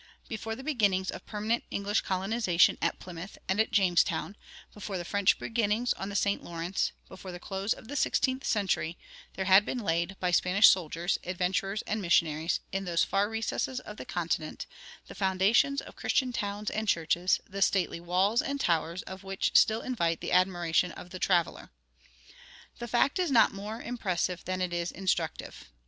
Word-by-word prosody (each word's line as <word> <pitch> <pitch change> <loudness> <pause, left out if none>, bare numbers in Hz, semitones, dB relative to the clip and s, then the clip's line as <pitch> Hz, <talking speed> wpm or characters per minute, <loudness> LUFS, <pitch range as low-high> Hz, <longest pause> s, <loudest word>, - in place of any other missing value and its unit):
Before 225 0 -4
the 265 - -10
beginnings 205 -10 +1
of - - -10
permanent 215 +2 -1
English 200 +1 0
colonization 190 -1 +2
at - - 0
Plymouth 180 +2 -9
and 190 +2 0
at 220 - 0
Jamestown, 190 +1 +2 0.4
before 205 -2 -5
the 175 - -5
French 200 +1 +2
beginnings 225 +1 0
on 195 - -6
the 200 - -6
St. 200 0 +1
Lawrence, 170 +2 -2 0.2
before 185 0 -9
the 175 - -8
close 195 +3 -4
of - - -2
the 285 - -6
sixteenth 260 -1 +1
century, 190 -5 0 0.4
there 190 - -2
had 190 +2 +7
been 255 - -3
laid 170 -3 -1
by 180 -1 0
Spanish 180 +4 +6
soldiers, 175 0 0
adventurers, 185 +3 -1
and 215 0 -2
missionaries, 165 -2 +1
in 195 0 -2
those 170 -2 +2
far 200 +1 +1
recesses 225 +3 -2
of 210 - -10
the - - -6
continent, 165 -3 -3 0.4
the - - -11
foundations 200 +9 +2
of - - -12
Christian 255 -3 0
towns 205 -1 -3
and 215 0 -3
churches, 170 +1 +2
the 195 0 -6
stately 185 -3 +2
walls 185 +7 +2
and 280 +1 -3
towers 170 - 0
of 190 +1 -9
which 195 0 -1
still 220 +1 +5
invite 170 -10 -1
the - - -5
admiration 180 -1 +2
of 180 - -11
the 185 - -7
traveler. 175 -3 0 1.1
The 240 - -5
fact 245 +7 +2
is 360 -3 +1
not 240 -5 +5
more 210 +3 -6
impressive 185 -7 -2
than 185 0 -2
it 180 -1 -3
is 170 0 -2
instructive. 190 - -3
195 Hz, 175 wpm, -29 LUFS, 180-215 Hz, 1.1 s, had